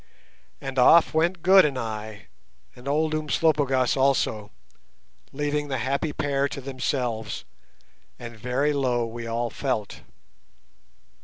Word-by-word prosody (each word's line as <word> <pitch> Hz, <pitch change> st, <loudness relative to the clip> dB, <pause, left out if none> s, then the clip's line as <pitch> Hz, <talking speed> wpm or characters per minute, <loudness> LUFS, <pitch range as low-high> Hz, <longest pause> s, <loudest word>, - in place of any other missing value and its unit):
And 135 Hz, -1 st, -4 dB
off 165 Hz, +8 st, +6 dB
went 170 Hz, +2 st, +1 dB
Good 190 Hz, +1 st, +7 dB
and 140 Hz, -3 st, 0 dB
I, 110 Hz, -3 st, -6 dB, 0.5 s
and 125 Hz, +2 st, -12 dB
old 155 Hz, +2 st, +1 dB
Umslopogaas 150 Hz, -4 st, +1 dB
also, 130 Hz, -6 st, +1 dB, 0.8 s
leaving 145 Hz, +1 st, -2 dB
the 135 Hz, -2 st, -2 dB
happy 140 Hz, +3 st, -1 dB
pair 140 Hz, -1 st, 0 dB
to 135 Hz, 0 st, -7 dB
themselves, 125 Hz, -4 st, -3 dB, 0.7 s
and 120 Hz, -1 st, -9 dB
very 125 Hz, +6 st, 0 dB
low 125 Hz, -4 st, 0 dB
we 115 Hz, 0 st, -7 dB
all 115 Hz, +1 st, -2 dB
felt. 125 Hz, -7 st, -3 dB
135 Hz, 120 wpm, -25 LUFS, 120-150 Hz, 0.8 s, Good